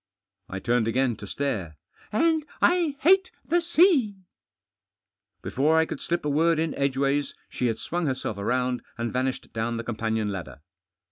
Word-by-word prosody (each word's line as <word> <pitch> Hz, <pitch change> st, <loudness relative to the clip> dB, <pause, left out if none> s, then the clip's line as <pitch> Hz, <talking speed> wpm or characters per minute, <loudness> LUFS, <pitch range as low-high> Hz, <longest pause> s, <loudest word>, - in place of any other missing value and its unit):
I 95 Hz, -, -4 dB
turned 120 Hz, +2 st, +1 dB
again 125 Hz, 0 st, +1 dB
to 105 Hz, -, -9 dB
stare. 95 Hz, -, -3 dB, 0.2 s
" -, -, -28 dB
And 320 Hz, +6 st, +2 dB, 0.2 s
I 345 Hz, -5 st, +3 dB
hate 375 Hz, +4 st, +5 dB, 0.2 s
the 345 Hz, +1 st, +3 dB
sea! 330 Hz, -, +4 dB, 0.7 s
" -, -, -59 dB
Before 150 Hz, +5 st, +2 dB
I 160 Hz, -, +4 dB
could -, -, -6 dB
slip 170 Hz, -2 st, -2 dB
a -, -, +1 dB
word 165 Hz, +3 st, +3 dB
in 160 Hz, 0 st, 0 dB
edgeways 140 Hz, +1 st, 0 dB
she 125 Hz, -, -1 dB
had 115 Hz, -2 st, -1 dB
swung 170 Hz, +6 st, -2 dB
herself 130 Hz, -6 st, -2 dB
round 125 Hz, +4 st, 0 dB, 0.2 s
and 115 Hz, 0 st, -3 dB
vanished 130 Hz, +1 st, -2 dB
down 115 Hz, +1 st, -2 dB
the 115 Hz, -, -4 dB
com 115 Hz, -1 st, -5 dB
panion 110 Hz, -2 st, -1 dB
ladder. 90 Hz, -7 st, -7 dB
135 Hz, 175 wpm, -26 LUFS, 115-175 Hz, 0.7 s, hate